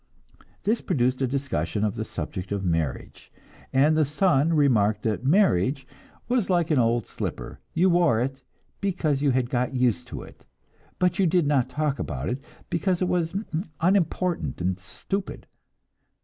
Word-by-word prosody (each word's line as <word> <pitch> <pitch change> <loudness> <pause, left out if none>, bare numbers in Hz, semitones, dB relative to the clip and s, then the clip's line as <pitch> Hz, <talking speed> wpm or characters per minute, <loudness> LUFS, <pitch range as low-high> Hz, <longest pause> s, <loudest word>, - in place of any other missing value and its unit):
This 225 +3 +1
produced 130 -6 0
a 130 - +2
discussion 130 -5 -2
of 105 -2 +1
the - - -3
subject 90 +2 -6
of 100 -1 -2
marriage, 80 -6 -3 0.4
and 145 +4 +4
the 155 - +4
son 150 0 +2
remarked 110 -9 +3
that 110 +1 -1
marriage 135 - +3 0.4
was 240 -5 +1
like 175 -2 +2
an 145 - +4
old 115 -2 +2
slipper; - - -6 0.2
you 175 +3 +4
wore 170 -10 +3
it, 135 +2 -2 0.4
because 170 -8 0
you 145 - +3
had 130 -1 0
got 125 +1 0
used 120 -10 +1
to - - -7
it, - - -16 0.5
but 180 +1 +1
you 190 - +4
did 170 -1 +3
not 135 -3 +2
talk 145 +1 -1
about 65 -2 -3
it, 130 +3 -3 0.2
because 180 +1 0
it 185 - +1
was 170 -1 0 0.4
unimportant 180 0 +1
and 90 +1 -1
stupid. 195 - -4
140 Hz, 160 wpm, -25 LUFS, 120-175 Hz, 0.5 s, and